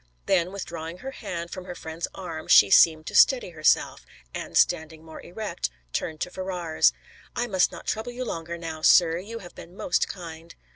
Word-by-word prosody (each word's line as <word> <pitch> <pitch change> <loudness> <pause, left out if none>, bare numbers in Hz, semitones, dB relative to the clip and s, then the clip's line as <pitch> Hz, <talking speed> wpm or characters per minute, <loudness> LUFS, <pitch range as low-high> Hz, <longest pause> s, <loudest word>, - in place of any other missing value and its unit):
Then, 175 +1 +2
withdrawing 170 -3 -6
her 265 +7 -7
hand 170 -9 -6
from 185 -1 -7
her 180 -1 -7
friend's 160 +1 -5
arm, 170 -4 -7
she 100 - +7
seemed 155 -2 +6
to - - -6
steady 250 -9 +5
herself, 155 -2 +1 0.3
and - - -4
standing 160 -1 +1
more 160 -1 -10
erect, 190 -1 -4 0.2
turned 155 -1 -3
to 180 - -2
Ferrars. 180 - +1 0.4
"I 240 - 0
must 190 -6 +2
not - - -10
trouble 220 +3 -3
you 250 +1 -5
longer, 170 -4 -5
now, 160 -2 -6
sir. 165 0 +5
You 220 +5 -7
have 175 - -12
been 175 +3 -13
most 180 - +1
kind." 165 -2 -9
170 Hz, 185 wpm, -26 LUFS, 160-190 Hz, 0.4 s, she